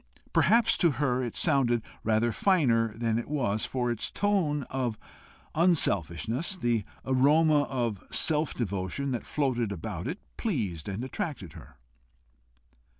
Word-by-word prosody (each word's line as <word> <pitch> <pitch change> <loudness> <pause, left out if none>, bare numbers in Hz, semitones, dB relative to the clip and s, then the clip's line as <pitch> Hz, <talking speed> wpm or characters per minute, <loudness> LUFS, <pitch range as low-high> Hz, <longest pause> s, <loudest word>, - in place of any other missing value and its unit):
Perhaps 230 +1 +4
to 170 -5 +4
her 130 -1 0
it 120 - -4
sounded 125 -7 +2 0.2
rather 110 +2 +2
finer 115 - +2
than 115 -1 0
it 120 - -7
was, 115 -8 0
for 125 -2 -1
its 120 - -3
tone 180 -8 0
of 125 -4 -3 0.6
unselfishness, 130 - +1
the 120 - 0 0.2
aroma 145 +3 +4
of 120 -7 -2
self 155 -1 0
devotion 100 +5 -2
that 120 - -4
floated 125 -7 0
about 85 0 -5
it, 165 +7 -3 0.2
pleased 105 - -2
and 100 +5 -4
attracted 130 - -5
her. 75 -4 -13
125 Hz, 130 wpm, -28 LUFS, 110-150 Hz, 0.6 s, Perhaps